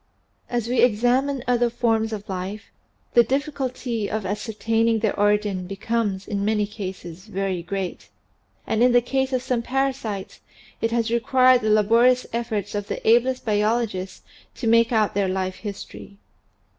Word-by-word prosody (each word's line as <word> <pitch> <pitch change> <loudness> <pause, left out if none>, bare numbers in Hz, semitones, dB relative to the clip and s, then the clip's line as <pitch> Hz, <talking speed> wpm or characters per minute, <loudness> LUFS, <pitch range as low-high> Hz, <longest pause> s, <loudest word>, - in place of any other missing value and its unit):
As 240 -2 -1
we 245 -1 +2
examine 245 +4 +2
other 240 -1 +2
forms 225 -2 0
of 215 -2 -4
animal 190 -3 -4 0.2
life 210 -1 -13 0.4
the 240 - +7
difficulty 255 -4 -2
of 215 -2 -3
ascertaining 225 +3 0
their 220 -2 0
origin 205 -3 +1
becomes 200 0 -2
in 200 -1 -2
many 210 0 +1
cases 190 -3 -8
very 195 -3 -2
great 190 +1 -5 0.6
and 220 - 0
in 245 0 +5
the 245 - +6
case 265 +2 -1
of 255 -1 -1
some 250 -2 0
parasites 255 -6 -2 0.4
it 225 - +1
has 230 -1 0
required 255 +1 +4
the 215 - -2
labo 215 +2 +4
rious 255 0 +2
efforts 220 -4 -2
of 205 -1 -3
the - - -5
ablest 250 +3 +3
biologists 210 -3 -1 0.3
to 250 - -6
make 230 +1 +4
out 220 -3 +2
their 200 -1 +1
life 185 0 -2
history. 200 -1 -9
225 Hz, 155 wpm, -23 LUFS, 205-240 Hz, 0.6 s, the